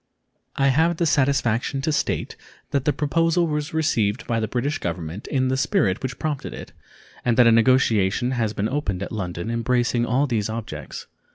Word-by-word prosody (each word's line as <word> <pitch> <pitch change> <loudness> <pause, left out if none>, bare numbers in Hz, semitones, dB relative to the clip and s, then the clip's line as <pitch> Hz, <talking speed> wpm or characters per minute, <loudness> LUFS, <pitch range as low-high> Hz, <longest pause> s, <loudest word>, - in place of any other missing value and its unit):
I 140 0 +3
have 160 +5 +2
the 170 - +1
satisfaction 135 -4 +1
to 155 - +1
state 150 - -1 0.4
that 140 -1 0
the 150 - +3
proposal 165 +4 +1
was 150 0 -2
received 120 - 0
by 115 -1 0
the 110 - -1
British 135 +6 -2
Government 85 +2 -5
in 130 -2 0
the 130 - +1
spirit 95 -7 +1
which 130 -1 -4
prompted 150 -3 -3
it, - - -9 0.5
and 120 -2 +1
that 125 - +7
a 115 - +6
negotiation 115 -1 +3
has 115 -4 0
been 105 0 -1
opened 105 -9 -2
at - - -6
London 90 0 -4
embracing 120 0 +1
all 130 +5 +2
these 110 -6 -1
objects. 105 - -6
125 Hz, 180 wpm, -23 LUFS, 110-145 Hz, 0.5 s, that